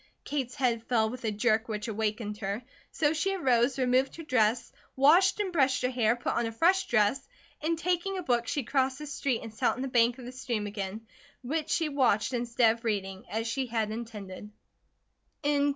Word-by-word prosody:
Kate's 265 -4 -3
head 240 -4 +1
fell 220 -3 +1
with 250 -1 -7
a 220 - +1
jerk 220 +1 +1
which 210 -1 -4
awakened 215 -1 -2
her, 200 +3 -3 0.3
so 300 -1 +1
she 390 +5 0
arose, 255 -6 +2
removed 255 +1 +2
her 330 - -8
dress, 235 -4 +1 0.2
washed 335 +10 +5
and 385 -3 -1
brushed 265 -5 +2
her 255 - +1
hair, 235 -2 +2
put 245 - -2
on 235 - 0
a - - -4
fresh 365 +11 +2
dress 220 +3 +2 0.4
and 325 +2 0
taking 360 +3 -1
a 365 - -4
book, 240 -5 +1
she 285 - -1
crossed 260 +1 0
the 300 - -7
street 275 -4 -2
and 225 -1 -8
sat 245 +3 +1
on 255 - -4
the - - -2
bank 240 -1 +3
of 255 - -10
the 250 - -7
stream 240 -4 -3
again, 205 +1 -5 0.4
which 305 +5 -2
she 330 -2 +1
watched 260 -5 +1
instead 235 -1 +2
of 230 - -18
reading, 195 -2 -2
as 225 +1 -2
she 255 +3 -2
had 225 -2 -1
intended. 210 -3 -7
245 Hz, 200 wpm, -29 LUFS, 220-275 Hz, 0.4 s, washed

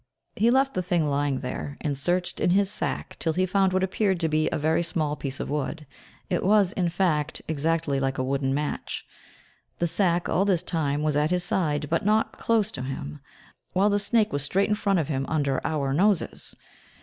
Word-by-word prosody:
He 225 +3 +3
left 270 +2 +3
the 185 - 0
thing 175 -3 +1
lying 140 -2 0
there, 140 +2 -5
and 145 -2 -2
searched 175 +6 -1
in - - +2
his 195 +2 +3
sack - - -3
till 160 - 0
he 185 +3 +1
found 190 0 +2
what 185 0 +1
appeared 190 -1 +1
to 165 - +2
be 155 +1 +1
a - - 0
very 160 +3 +1
small 155 -3 -1
piece 135 -2 -4
of - - -3
wood, 150 +2 -3 0.4
it 180 -3 -1
was, 200 -1 +4
in 180 -2 0
fact, 165 -4 0
exactly 160 -2 0
like 135 0 -1
a 130 - 0
wooden 135 0 0
match. 145 +2 -3 0.7
The 175 - 0
sack, 175 0 +1
all 190 - +2
this 190 -4 +1
time, 150 -3 -1
was 155 -1 +1
at 150 +1 +2
his 180 0 +1
side, 150 -5 0
but 165 +7 0
not 215 +2 +1
close 220 -2 +1
to 130 - -6
him, 75 - -5 0.5
while 200 +3 +3
the 205 - +2
snake 210 -1 +1
was 145 - 0
straight 195 +9 +1
in - - +3
front 200 -2 +1
of 160 -5 0
him, 135 -3 -1
under 140 -4 0
our 140 -3 -1
noses. 195 +4 0
165 Hz, 210 wpm, -26 LUFS, 145-190 Hz, 0.7 s, was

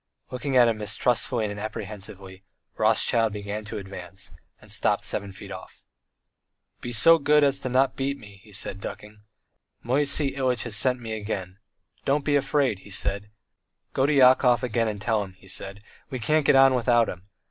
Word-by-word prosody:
Looking 130 +1 -1
at 120 -1 +7
him 115 -2 0
mistrustfully 110 +2 0
and 105 0 -5
apprehensively, 100 -3 -8 0.3
Rothschild 115 -2 +2
began 105 +1 -5
to 105 - -6
advance, 95 -2 -8 0.3
and - - -13
stopped - - +1
seven 100 0 -3
feet 95 - -11
off. - - -11 1.0
"Be 120 - -6
so 165 +9 +6
good 150 +1 +4
as 140 -1 +2
not 130 +1 +2
to - - -33
beat 140 +1 -2
me," 100 -4 -15
he 105 - -17
said, 100 0 -3
ducking. 105 +1 -9 0.6
"Moisey 140 +2 +1
Ilyitch 130 -3 0
has 120 -4 -1
sent 125 +3 +3
me 115 -2 -6
again. 100 -3 -5 0.4
'Don't 140 +1 0
be 145 - +2
afraid,' 135 -6 +1
he 100 - -15
said; 100 +1 -3 0.6
'go 135 - +2
to 150 - +2
Yakov 125 -3 +5
again 115 -2 0
and 105 -2 -4
tell 110 +1 0
him,' 95 -2 -11
he 95 - -19
said, 95 +2 -6 0.3
'we 130 - -4
can't 150 +5 +1
get - - +5
on 135 0 +6
without 120 -2 +3
him.' 90 +2 -8
115 Hz, 180 wpm, -25 LUFS, 100-130 Hz, 1.0 s, at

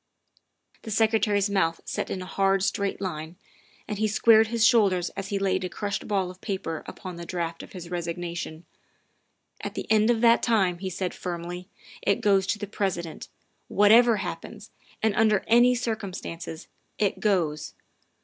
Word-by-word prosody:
' - - -38
' - - -35
The 225 - -8
Secretary's 215 -2 +2
mouth 190 -5 +1
set - - -3
in 185 - -4
a - - -8
hard, 195 0 +1
straight 195 0 -1
line, 165 -3 -5 0.5
and 210 -1 -4
he 215 - +2
squared 220 +1 +5
his 230 0 +2
shoulders 195 -7 +3
as 195 0 -6
he 200 - -1
laid 190 -1 0
a 180 - -3
crushed 200 +1 -4
ball 195 -3 0
of 185 - -17
paper 190 -6 -3
upon 185 -2 -8
the 170 - -7
draft 170 -2 -3
of - - -12
his 175 -2 -8
resignation. 170 -1 -4 0.5
" - - -26
At - - -5
the - - -4
end 215 +1 +4
of 230 -2 +2
that 235 -1 +5
time," 190 -7 +2
he 190 0 -3
said 185 0 -3
firmly, 175 +1 -6 0.2
" - - -18
it 200 - +1
goes 200 -4 +3
to - - 0
the 205 - -4
President. 185 -5 -3 0.4
Whatever 225 +3 +6
happens, - - -7 0.3
and 220 -2 +3
under 215 -1 +3
any 240 +2 +5
circumstances, 190 -8 -5 0.3
it 205 -2 0
goes. 160 -7 0
195 Hz, 180 wpm, -26 LUFS, 175-215 Hz, 0.5 s, Whatever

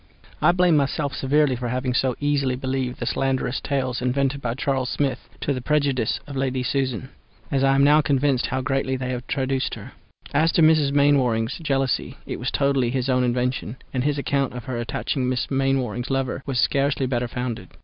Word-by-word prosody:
I 155 - +6
blame 180 -2 +3
myself 140 0 0
severely 140 +1 +2
for 120 0 -4
having 125 +1 -1
so 125 0 +1
easily 140 -3 +1
believed 130 -1 -3
the - - -3
slanderous 135 -1 -1
tales 130 -3 -1
invented 135 +2 0
by 120 -2 -2
Charles 135 -1 -1
Smith 140 -2 -2
to 145 - 0
the 130 - -4
prejudice 140 -4 +1
of 145 -1 -8
Lady 130 -1 -1
Susan, 130 - -1 0.4
as 135 -1 +1
I 135 0 +4
am 140 - +4
now 150 +2 +6
convinced 140 -2 +1
how 130 +1 -2
greatly 135 0 0
they 130 0 -3
have 125 0 -5
traduced 135 -1 -1
her. - - -10 0.4
As 160 +3 +3
to 165 - +4
Mrs. 155 -3 +4
Mainwaring's 135 -5 +2
jealousy 135 -5 -1
it - - -5
was - - -1
totally 140 -3 +1
his 130 +1 -1
own 125 -1 +3
invention, 125 -1 -1 0.2
and 130 -1 0
his 145 0 0
account 140 -2 0
of 125 -1 -6
her 120 -1 -4
attaching 125 +2 -2
Miss 130 +1 -2
Mainwaring's 135 -3 0
lover 135 -1 -1
was 130 -3 0
scarcely 140 0 +2
better 125 -1 -1
founded. 120 -6 -4
135 Hz, 190 wpm, -23 LUFS, 125-140 Hz, 0.4 s, I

